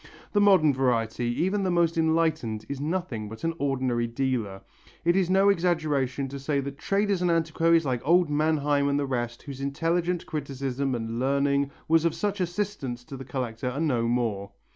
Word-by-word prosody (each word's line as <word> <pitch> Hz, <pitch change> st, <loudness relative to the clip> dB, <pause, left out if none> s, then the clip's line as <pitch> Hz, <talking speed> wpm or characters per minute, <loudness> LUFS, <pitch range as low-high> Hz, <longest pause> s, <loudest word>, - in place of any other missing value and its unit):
The 205 Hz, -, +3 dB
modern 185 Hz, -8 st, +5 dB
variety, 120 Hz, -3 st, 0 dB, 0.2 s
even 195 Hz, +3 st, 0 dB
the 190 Hz, -, 0 dB
most 170 Hz, -2 st, +2 dB
enlightened, 160 Hz, -9 st, 0 dB
is 140 Hz, -1 st, -5 dB
nothing 150 Hz, -, -3 dB
but 110 Hz, +1 st, -10 dB
an 165 Hz, 0 st, 0 dB
ordinary 130 Hz, -4 st, 0 dB
dealer. 115 Hz, -6 st, -2 dB, 0.4 s
It 170 Hz, +1 st, +4 dB
is 190 Hz, -2 st, +2 dB
no 195 Hz, +2 st, +4 dB
exaggeration 155 Hz, -8 st, 0 dB
to 140 Hz, +1 st, -6 dB
say 140 Hz, +1 st, -1 dB
that 140 Hz, 0 st, -5 dB
traders 200 Hz, -2 st, 0 dB
and 180 Hz, -, +2 dB
antiquaries 165 Hz, 0 st, +2 dB
like 125 Hz, -3 st, -1 dB
old 175 Hz, +3 st, +4 dB
Manheim 145 Hz, -1 st, +1 dB
and 140 Hz, -, +1 dB
the 145 Hz, -, 0 dB
rest 120 Hz, -3 st, -3 dB
whose 135 Hz, -1 st, -8 dB
intelligent 165 Hz, +5 st, -1 dB
criticism 135 Hz, -2 st, -3 dB
and 115 Hz, 0 st, -4 dB
learning 140 Hz, +1 st, +1 dB, 0.2 s
was 165 Hz, 0 st, +4 dB
of 170 Hz, -, +1 dB
such 205 Hz, -2 st, -2 dB
assistance 175 Hz, -9 st, -3 dB
to 135 Hz, -, -9 dB
the 135 Hz, 0 st, -8 dB
collector 125 Hz, -2 st, -3 dB
are 130 Hz, +3 st, -4 dB
no 125 Hz, -8 st, +1 dB
more. 115 Hz, -5 st, -1 dB
140 Hz, 180 wpm, -26 LUFS, 125-165 Hz, 0.4 s, modern